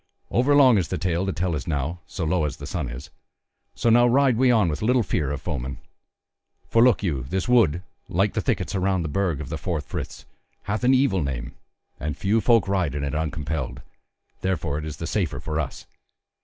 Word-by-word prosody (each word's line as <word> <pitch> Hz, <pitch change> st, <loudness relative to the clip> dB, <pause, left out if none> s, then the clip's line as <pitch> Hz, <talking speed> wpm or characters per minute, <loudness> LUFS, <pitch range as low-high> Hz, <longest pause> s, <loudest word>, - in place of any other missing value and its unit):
Over 130 Hz, +4 st, +3 dB
long 130 Hz, -7 st, +6 dB
is 85 Hz, -, -1 dB
the -, -, -3 dB
tale 90 Hz, +1 st, -1 dB
to -, -, +1 dB
tell 90 Hz, -1 st, -1 dB
as 75 Hz, +2 st, -4 dB
now, 80 Hz, +2 st, -2 dB
so 85 Hz, -, -4 dB
low 80 Hz, 0 st, +1 dB
as 75 Hz, -, -4 dB
the -, -, -8 dB
sun -, -, -3 dB
is; 65 Hz, +5 st, -8 dB, 0.6 s
so 115 Hz, -, +2 dB
now 120 Hz, +1 st, +6 dB
ride 130 Hz, 0 st, +4 dB
we 130 Hz, +2 st, +3 dB
on 110 Hz, -6 st, +4 dB
with 75 Hz, -2 st, -2 dB
little 120 Hz, +2 st, +3 dB
fear 80 Hz, -7 st, -1 dB
of 70 Hz, -1 st, -4 dB
foemen. 65 Hz, -6 st, -4 dB, 0.9 s
For 115 Hz, -, +4 dB
look 125 Hz, -4 st, +4 dB
you, 75 Hz, -9 st, -1 dB
this 95 Hz, +1 st, -1 dB
wood, 100 Hz, -9 st, +3 dB, 0.3 s
like -, -, +1 dB
the -, -, 0 dB
thickets -, -, -1 dB
about 95 Hz, -2 st, +1 dB
the -, -, -2 dB
Burg 85 Hz, -1 st, -1 dB
of 70 Hz, -4 st, -6 dB
the 80 Hz, 0 st, -4 dB
Four 85 Hz, +2 st, -2 dB
Friths, 70 Hz, -, -6 dB, 0.4 s
hath 105 Hz, +4 st, -3 dB
an 130 Hz, +2 st, +5 dB
evil 130 Hz, -9 st, +2 dB
name, 70 Hz, -1 st, -4 dB, 0.5 s
and 75 Hz, 0 st, -3 dB
few 105 Hz, +4 st, +1 dB
folk 115 Hz, -3 st, +4 dB
ride 90 Hz, -8 st, 0 dB
it 70 Hz, -1 st, -2 dB
uncompelled; 75 Hz, -2 st, -3 dB, 0.6 s
therefore 85 Hz, -6 st, -1 dB
it 75 Hz, -, -6 dB
is 75 Hz, -1 st, -6 dB
the 80 Hz, -, -5 dB
safer 90 Hz, 0 st, -1 dB
for 80 Hz, 0 st, -3 dB
us. 75 Hz, -, -4 dB
90 Hz, 210 wpm, -24 LUFS, 75-110 Hz, 0.9 s, long